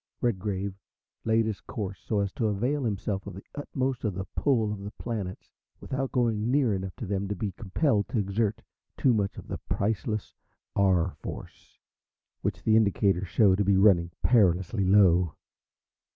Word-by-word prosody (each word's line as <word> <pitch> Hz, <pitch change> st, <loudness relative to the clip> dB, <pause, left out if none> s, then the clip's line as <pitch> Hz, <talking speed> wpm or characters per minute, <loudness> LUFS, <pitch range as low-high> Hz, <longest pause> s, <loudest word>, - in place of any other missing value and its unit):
Redgrave 100 Hz, -4 st, -1 dB, 0.5 s
laid 110 Hz, 0 st, +3 dB
his 110 Hz, -2 st, -3 dB
course 100 Hz, -3 st, -5 dB
so 105 Hz, -2 st, -1 dB
as 100 Hz, -1 st, -1 dB
to 115 Hz, -, 0 dB
avail 125 Hz, +8 st, 0 dB
himself 100 Hz, -2 st, -2 dB
to -, -, -5 dB
the 95 Hz, +1 st, -9 dB
utmost 135 Hz, -3 st, -2 dB
of 105 Hz, -5 st, -1 dB
the 95 Hz, -, -4 dB
"pull" 115 Hz, -7 st, +2 dB
of 105 Hz, -, -6 dB
the 100 Hz, +1 st, -6 dB
planets 105 Hz, -4 st, -5 dB, 0.3 s
without 135 Hz, 0 st, -3 dB
going 115 Hz, -3 st, +1 dB
near 130 Hz, -4 st, +3 dB
enough 95 Hz, -1 st, -4 dB
to -, -, -6 dB
them 100 Hz, 0 st, -2 dB
to 100 Hz, -, -2 dB
be 100 Hz, +1 st, -3 dB
compelled 105 Hz, -, 0 dB
to -, -, -3 dB
exert 105 Hz, +2 st, 0 dB, 0.3 s
too 130 Hz, -4 st, +4 dB
much 100 Hz, -3 st, -1 dB
of -, -, -9 dB
the -, -, -5 dB
priceless 105 Hz, 0 st, -1 dB, 0.4 s
R. 95 Hz, -3 st, +3 dB
Force, -, -, -9 dB, 0.6 s
which -, -, -3 dB
the 110 Hz, -, +4 dB
indicators 100 Hz, -3 st, +2 dB
showed 100 Hz, 0 st, +4 dB
to -, -, +4 dB
be 100 Hz, 0 st, +3 dB
running 95 Hz, -4 st, +5 dB
perilously 95 Hz, -3 st, +3 dB
low. 90 Hz, -4 st, +4 dB
105 Hz, 165 wpm, -28 LUFS, 95-115 Hz, 0.6 s, running